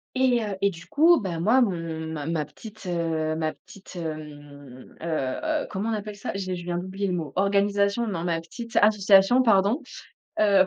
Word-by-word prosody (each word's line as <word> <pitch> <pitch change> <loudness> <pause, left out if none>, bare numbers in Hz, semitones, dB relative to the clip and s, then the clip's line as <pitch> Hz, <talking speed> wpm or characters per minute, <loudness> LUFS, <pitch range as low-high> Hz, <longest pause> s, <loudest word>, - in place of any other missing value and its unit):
Et 255 -2 +3
heu, 205 -2 -4
et 200 - +4
du 170 -2 -12
coup, 320 +3 +5
ben 175 -4 -3
moi, 230 +9 +4
mon 165 -6 -2
ma 150 -2 -5
ma 160 -2 -1
petite, 215 +8 -12
heu, 165 -3 -1
ma 155 -1 -2
petite, 195 -1 -15
hem, 145 -5 -8
heu - - -6 0.4
heu, 315 -1 -1
comment 200 +4 -3
on - - 0
appelle 210 0 -5
ça? 205 - -5
J'ai 185 -2 -3
je 175 -1 -7
viens 175 0 -2
d'oublier 190 +3 -3
le 185 - -1
mot, 160 -5 -4
organisation, 200 +3 +2
non, 190 -6 -3
ma 170 -2 0
petite 230 +7 -8
association 205 +2 +5
pardon, 220 +4 +3 0.6
heu, 200 -3 +5
190 Hz, 190 wpm, -25 LUFS, 165-215 Hz, 0.6 s, coup